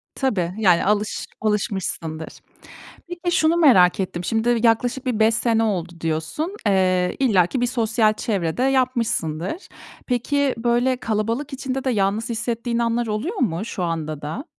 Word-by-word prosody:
Tabii, 190 Hz, -11 st, -1 dB
yani 180 Hz, -6 st, +4 dB
alış 210 Hz, +1 st, 0 dB
alışmışsındır. 190 Hz, -7 st, -2 dB, 0.8 s
Peki, 350 Hz, 0 st, -3 dB
şunu 325 Hz, -1 st, +3 dB
merak 200 Hz, -, +5 dB
ettim, 180 Hz, -2 st, -3 dB
şimdi 225 Hz, +4 st, +1 dB
yaklaşık 245 Hz, +3 st, +1 dB
bir 245 Hz, -4 st, -1 dB
5 220 Hz, +1 st, +4 dB
sene 225 Hz, 0 st, +1 dB
oldu 180 Hz, -6 st, -2 dB
diyorsun. 165 Hz, -, -2 dB
Eee, 185 Hz, -2 st, +2 dB
illaki 225 Hz, -2 st, +2 dB
bir 245 Hz, -, +3 dB
sosyal 225 Hz, -2 st, +2 dB
çevre 195 Hz, -7 st, -2 dB
de 250 Hz, -, +1 dB
yapmışsındır. 245 Hz, -, 0 dB, 0.4 s
Peki, 270 Hz, +2 st, +1 dB
böyle 240 Hz, +2 st, +1 dB
kalabalık 230 Hz, +6 st, -2 dB
içinde 265 Hz, 0 st, -3 dB
de 265 Hz, -, 0 dB
yalnız 205 Hz, +1 st, 0 dB
hissettiğin 235 Hz, +1 st, -2 dB
anlar 235 Hz, 0 st, 0 dB
oluyor 220 Hz, -, -3 dB
mu 205 Hz, -4 st, -1 dB
şu 195 Hz, -5 st, -4 dB
anda 155 Hz, -3 st, -3 dB
da? 160 Hz, -, -5 dB
225 Hz, 145 wpm, -22 LUFS, 185-255 Hz, 0.8 s, merak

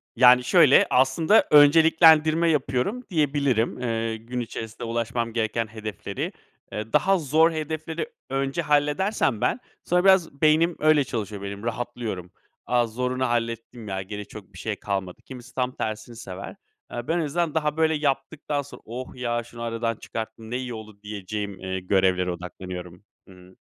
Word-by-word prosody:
Yani, 125 Hz, +1 st, +7 dB
şöyle, 145 Hz, +1 st, +6 dB
aslında 135 Hz, +11 st, +4 dB
önceliklendirme 160 Hz, +2 st, +6 dB
yapıyorum 140 Hz, -, 0 dB
diyebilirim. 140 Hz, -, +1 dB
Eee, 115 Hz, -2 st, -1 dB
gün 120 Hz, +3 st, -6 dB
içerisinde 115 Hz, -1 st, -6 dB
ulaşmam 115 Hz, 0 st, -2 dB
gereken 115 Hz, 0 st, -1 dB
hedefleri, 110 Hz, -1 st, -5 dB, 0.4 s
eee, 110 Hz, +1 st, -6 dB
daha 195 Hz, 0 st, +4 dB
zor 160 Hz, +2 st, +3 dB
hedefleri 160 Hz, -, -4 dB, 0.2 s
önce 135 Hz, +4 st, -1 dB
halledersem 150 Hz, -, +1 dB
ben, -, -, +1 dB, 0.2 s
sonra 180 Hz, +1 st, +2 dB
biraz 180 Hz, -7 st, +3 dB
beynim 160 Hz, +2 st, +4 dB
öyle 155 Hz, -2 st, +4 dB
çalışıyor 105 Hz, -5 st, -5 dB
benim. 100 Hz, +1 st, -6 dB
Rahatlıyorum, 115 Hz, -6 st, -4 dB, 0.3 s
a, 120 Hz, -1 st, +2 dB
zorunu 125 Hz, +3 st, -1 dB
hallettim 115 Hz, -1 st, -3 dB
ya, 95 Hz, -1 st, -3 dB
geri 105 Hz, +2 st, -7 dB
çok 105 Hz, -4 st, -12 dB
bir -, -, -12 dB
şey -, -, -3 dB
kalmadı. 95 Hz, -3 st, -4 dB
Kimisi 130 Hz, 0 st, -11 dB
tam 125 Hz, -1 st, 0 dB
tersini 110 Hz, +2 st, -4 dB
sever. 95 Hz, -4 st, -8 dB, 0.4 s
Eee, 120 Hz, 0 st, -5 dB
ben 165 Hz, -, +1 dB
en 165 Hz, -, 0 dB
azından 165 Hz, +1 st, -1 dB
daha, 150 Hz, -1 st, 0 dB
böyle, 160 Hz, 0 st, +3 dB
yaptıktan 145 Hz, 0 st, -1 dB
sonra 140 Hz, -, -12 dB
oh, 125 Hz, +3 st, -7 dB
ya, 120 Hz, -1 st, -2 dB
şunu 120 Hz, 0 st, -12 dB
aradan 115 Hz, 0 st, -2 dB
çıkarttım, 110 Hz, 0 st, -7 dB
ne 125 Hz, -, -1 dB
iyi 125 Hz, -1 st, -5 dB
oldu 110 Hz, -2 st, -10 dB
diyeceğim, 105 Hz, -1 st, -5 dB
eee, 95 Hz, 0 st, -3 dB
görevlere 90 Hz, -1 st, +2 dB
odaklanıyorum. 90 Hz, 0 st, -8 dB, 0.2 s
Hı. 90 Hz, -1 st, -16 dB
120 Hz, 150 wpm, -25 LUFS, 110-150 Hz, 0.4 s, Yani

